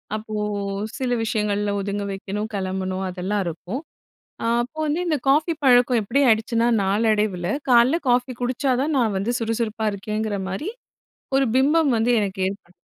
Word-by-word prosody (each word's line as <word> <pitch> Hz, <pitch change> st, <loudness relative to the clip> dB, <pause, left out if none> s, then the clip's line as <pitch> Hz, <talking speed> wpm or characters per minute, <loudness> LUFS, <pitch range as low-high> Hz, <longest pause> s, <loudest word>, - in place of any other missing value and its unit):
அப்போ 215 Hz, 0 st, -6 dB, 0.6 s
சில 260 Hz, -3 st, -2 dB
விஷயங்கள்ல 210 Hz, -2 st, 0 dB
ஒதுங்க 200 Hz, +1 st, -3 dB
வெக்கணும் 200 Hz, +2 st, -4 dB
கெளம்பணும் 190 Hz, 0 st, -2 dB
அதெல்லாம் 190 Hz, +3 st, -2 dB
இருக்கும். 180 Hz, -, -5 dB, 0.6 s
அ -, -, -1 dB, 0.2 s
அப்போ 255 Hz, +6 st, -10 dB
வந்து 305 Hz, +3 st, 0 dB
இந்த 320 Hz, -3 st, +2 dB
காஃபி 300 Hz, +5 st, +3 dB
பழக்கம் 245 Hz, -1 st, +5 dB
எப்டி 265 Hz, +7 st, +1 dB
ஆயிடுச்சுனா 225 Hz, +1 st, +2 dB, 0.2 s
நாளடைவுல 205 Hz, -2 st, +1 dB, 0.2 s
காலைல 245 Hz, +5 st, +5 dB
காஃபி 250 Hz, +1 st, +2 dB
குடிச்சாதான் 260 Hz, +3 st, 0 dB
நான் 225 Hz, -5 st, +1 dB
வந்து 210 Hz, +5 st, -1 dB
சுறுசுறுப்பா 225 Hz, -1 st, -2 dB
இருக்கேங்குற 210 Hz, +1 st, -3 dB
மாரி 195 Hz, -, -3 dB, 0.7 s
ஒரு 270 Hz, -, +3 dB
பிம்பம் 290 Hz, +3 st, +4 dB
வந்து 225 Hz, +2 st, +2 dB
எனக்கு 200 Hz, -1 st, -3 dB
ஏற்படு 195 Hz, -2 st, -8 dB
220 Hz, 140 wpm, -23 LUFS, 200-250 Hz, 0.7 s, பழக்கம்